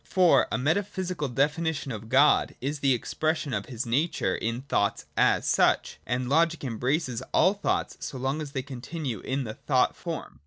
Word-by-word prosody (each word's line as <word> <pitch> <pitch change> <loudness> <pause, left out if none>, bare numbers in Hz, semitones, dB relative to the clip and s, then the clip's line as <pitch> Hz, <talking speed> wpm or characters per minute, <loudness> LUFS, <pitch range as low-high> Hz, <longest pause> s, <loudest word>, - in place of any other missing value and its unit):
For 175 -8 +4
a - - +1
metaphysical 180 - -1
definition 145 +2 0
of 110 -1 -7
God 140 +4 +4
is 140 +3 -3
the 135 -1 +2
expression 155 +3 -2
of - - -2
his 125 -2 -4
nature 140 +9 0
in 115 +3 -3
thoughts 100 -7 0
as - - +3
such: - - +2
and 125 0 -1
logic 165 +4 +2
embraces 125 +1 -1
all 185 +4 +5
thoughts 205 - -2
so 135 - -6
long 135 +4 -2
as 145 -2 -7
they 135 -3 -2
continue 135 - -5
in 135 +6 -2
the 110 -3 -5
thought - - +1
form. - - -6
140 Hz, 170 wpm, -27 LUFS, 125-160 Hz, -, all